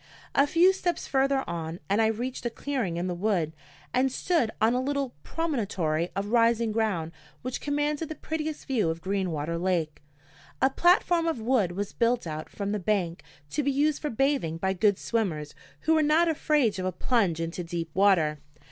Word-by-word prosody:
A 280 - +4
few 350 +5 +5
steps 355 -2 -2
further 270 0 +1
on 165 0 -4
and 200 +5 +2
I 220 - +4
reached 240 +4 -3
a - - -1
clearing 235 -9 -3
in 175 - -1
the 180 - -1
wood 175 -4 0 0.4
and 255 +1 +2
stood 325 -4 +1
on 225 +2 +4
a 250 - +1
little 275 -1 -2
promontory 195 - -1
of 200 +1 -2
rising 230 -1 +3
ground 205 -8 -1 0.3
which 255 0 -4
commanded 295 +2 -1
the 315 - -5
prettiest 310 0 -4
view 225 -11 +1
of 165 +1 -4
Greenwater 170 -4 -2
lake. 170 -4 -1 0.6
A 265 +1 +3
platform 345 +1 +3
of 320 -7 -1
wood 220 -6 +1
was 200 +2 -4
built 235 -2 +1
out 155 -1 -5
from 200 -1 -4
the 210 - -1
bank, 180 -3 -1 0.3
to 300 - 0
be 280 - 0
used 290 +2 +1
for 300 - -2
bathing 270 - 0
by 190 +3 0
good 200 +1 +2
swimmers 165 -11 -2 0.3
who 320 - +2
were 315 - +4
not 310 +3 +4
afraid 295 - +1
of 185 - -2
a - - 0
plunge 185 -3 +1
into 165 +2 -3
deep 165 -1 -4
water. 175 -6 +3
220 Hz, 185 wpm, -27 LUFS, 175-280 Hz, 0.6 s, few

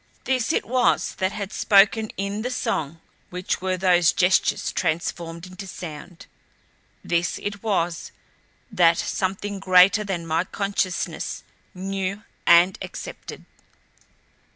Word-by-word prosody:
This 255 -2 0
it - - 0
was 250 +1 +1
that 190 0 +1
had 200 -1 -6
spoken 210 +1 +4
in 200 +2 -3
the 245 - -2
song 165 - -2 0.3
which 180 0 -3
were 185 0 -1
those 180 -2 +4
gestures 180 +1 +2
transformed 170 0 -3
into 185 +1 -9
sound. 170 -1 -9 0.8
This 170 0 0
it 200 -1 -5
was 175 -6 -1 0.6
that 170 -5 +4
something 195 +1 -2
greater 185 +2 +5
than 185 -5 -4
my 165 +1 0
consciousness 195 -1 -3 0.3
knew 195 +2 -3 0.2
and 175 +2 +6
accepted. - - -8
185 Hz, 115 wpm, -23 LUFS, 175-200 Hz, 0.8 s, and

